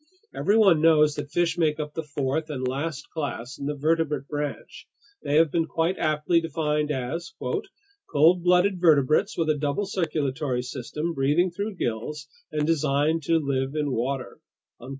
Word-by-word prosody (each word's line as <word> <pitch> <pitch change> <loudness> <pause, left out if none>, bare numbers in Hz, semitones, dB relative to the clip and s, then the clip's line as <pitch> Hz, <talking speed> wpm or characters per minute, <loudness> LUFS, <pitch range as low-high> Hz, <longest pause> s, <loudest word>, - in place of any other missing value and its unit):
Everyone 200 -6 +4
knows 155 -2 +5
that 145 -1 -6
fish 175 0 0
make 155 -2 +1
up 150 -1 -4
the 160 - -3
fourth 150 +1 -2
and 130 -4 -3
last 145 +3 -3
class 140 -5 -5
in 140 - -4
the 150 - -2
vertebrate 150 -1 0
branch. 145 -1 -5 0.3
They 145 - -1
have 160 -1 +4
been 165 +1 0
quite 165 +4 -1
aptly 155 +2 +2
defined 150 -2 -1
as: 150 +5 -3
"cold 180 - 0
blooded 180 +1 +3
vertebrates 155 +3 +3
with 160 -2 +2
a - - 0
double 150 +8 -1
circulatory 145 -8 -2
system, 145 +6 -4
breathing 150 +6 +2
through 200 +4 -4
gills, 145 +3 -4 0.2
and 150 -1 0
designed 155 0 +1
to 165 +2 +3
live 135 -2 -1
in 150 -2 -1
water." 130 +2 -3
150 Hz, 155 wpm, -25 LUFS, 140-165 Hz, 0.3 s, knows